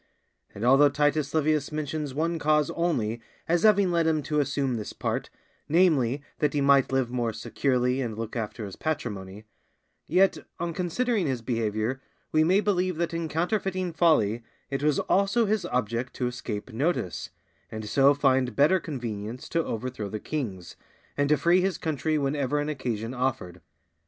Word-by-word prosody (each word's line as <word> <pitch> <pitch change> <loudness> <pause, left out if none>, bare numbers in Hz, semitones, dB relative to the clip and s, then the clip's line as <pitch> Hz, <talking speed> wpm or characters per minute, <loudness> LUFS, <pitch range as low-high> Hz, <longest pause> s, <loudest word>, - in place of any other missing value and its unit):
And 105 - -3
although 135 +3 +6
Titus 145 0 +1
Livius 155 -2 +1
mentions 150 -1 -3
one 165 +4 -1
cause 150 -1 +2
only 120 -10 -1 0.3
as 170 0 +2
having 200 -3 +4
led 170 -1 +2
him 155 -2 +1
to 150 +1 0
assume 140 -2 0
this 105 - -6
part, - - -3 0.4
namely, 145 -6 +3 0.2
that 150 -1 +1
he - - +2
might 140 -1 +4
live 130 -2 0
more 120 -2 -1
securely 125 +3 0
and 115 -4 -4
look 115 -1 -5
after 110 -1 -4
his 100 - -8
patrimony; 105 -10 -4 0.6
yet 190 +4 +3 0.2
on 170 0 -2
considering 195 +2 0
his 130 -4 -2
behavior 115 +1 -1 0.3
we 155 0 +4
may 185 +5 +4
believe 185 -4 0
that 170 0 -1
in 165 -1 -2
counterfeiting 185 +1 -1
folly 120 - +3 0.3
it 135 - -1
was 150 -1 +2
also 200 +4 +2
his 215 -1 0
object 125 +1 -2
to 125 - -2
escape 120 -2 -5
notice, 110 - -1 0.4
and 110 -1 -6
so 140 +4 +4
find 130 -4 +2
better 165 +7 +4
convenience 120 -6 -5
to 165 -1 +1
overthrow 115 -4 -4
the 110 - -4
kings, 105 - -5 0.4
and 145 0 +1
to 150 - +4
free 170 +6 +4
his 190 0 0
country 155 -1 -1
whenever 145 0 0
an 145 +1 -2
occasion 120 -5 -3
offered. 125 -9 -2
140 Hz, 165 wpm, -27 LUFS, 120-165 Hz, 0.6 s, although